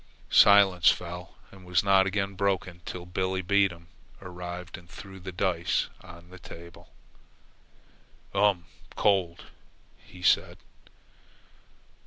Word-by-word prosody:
Silence 100 -3 +6
fell 90 0 -4 0.2
and 95 -1 -15
was 90 -2 +1
not 95 -1 +4
again 100 0 -2
broken 95 -2 -2
till 90 -1 -7
Billebedam 95 0 0 0.3
arrived 90 -1 -8
and 85 -2 -15
threw 95 +1 -11
the 95 +1 -7
dice 90 -2 -1
box - - -20
on 85 -1 -14
the 95 - -12
table. 85 +1 -13 1.4
"Um 100 -2 +2 0.3
much - - -20
cold," 95 -5 +1 0.6
he 90 -1 -15
said. - - +2
90 Hz, 115 wpm, -27 LUFS, 85-95 Hz, 1.4 s, Silence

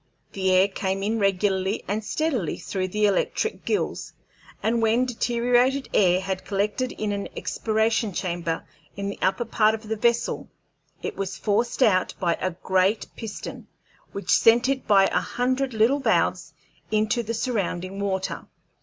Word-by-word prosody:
The 190 -1 -1
air 185 +1 +5
came 195 0 -2
in 220 +2 0
regularly 195 0 +1
and 210 +3 -2
steadily 255 - -1
through 185 -1 -3
the 210 +3 +1
electric 210 - 0
gills, 425 - -2 0.5
and 230 +1 +1
when 225 +3 +3
deteriorated 245 +2 +1
air 180 -2 +4
had 190 -1 -3
collected 210 +6 -1
in 215 -1 -3
the 200 -1 -3
expiration 220 0 0
chamber 170 -3 -3 0.3
in 200 0 -3
the 200 - -7
upper 235 +5 +1
part 220 -1 +3
of 220 0 -11
the 220 - -1
vessel, 235 +2 0 0.5
it - - -3
was 195 -1 -4
forced 230 +5 +1
out 185 -6 +2
by 175 -2 +2
a 185 - +1
great 190 +3 0
piston, 220 -2 -7 0.4
which 195 -3 -3
sent 235 +6 +5
it 270 -1 -1
by 195 -2 +6
a - - +1
hundred 255 +2 -1
little 230 +6 +3
valves 270 - +1 0.3
into 215 +2 +1
the 230 0 -4
surrounding 195 -5 -2
water. 190 -2 -2
210 Hz, 155 wpm, -25 LUFS, 190-235 Hz, 0.5 s, by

